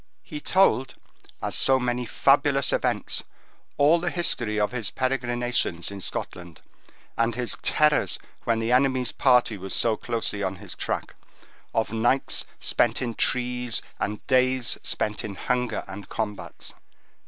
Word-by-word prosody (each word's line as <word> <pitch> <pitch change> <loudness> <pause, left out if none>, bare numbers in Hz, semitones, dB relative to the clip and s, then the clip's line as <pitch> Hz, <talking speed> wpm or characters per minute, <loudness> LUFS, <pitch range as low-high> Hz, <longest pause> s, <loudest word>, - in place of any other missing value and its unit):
He 150 - -7
told, 135 -9 +3 0.5
as - - -2
so 135 0 +5
many 125 -1 -1
fabulous 140 +2 +3
events, - - 0 0.5
all 150 +4 +5
the 175 +1 -1
history 120 -12 0
of 105 - +1
his 115 -5 -3
perigrinations 120 -8 -1
in 100 -1 -7
Scotland, 85 -2 -6 0.6
and 115 0 +1
his 125 -1 -2
terrors 150 -1 +2 0.3
when 115 -1 +1
the 115 +1 -1
enemy's 130 -1 +3
party 125 -5 +3
was 95 0 -3
so 115 -2 +3
closely 115 -3 -2
on 95 -1 -1
his 90 - -10
track; - - -3 0.6
of 110 -1 -1
nights 120 +4 +1
spent 120 -2 +1
in 120 -3 -2
trees, 125 -1 0 0.2
and 105 +1 -3
days 130 -1 +2
spent 105 0 -2
in 100 -2 -5
hunger 125 +4 -1
and 95 0 -9
combats. 105 -3 -5
120 Hz, 140 wpm, -25 LUFS, 110-130 Hz, 0.6 s, so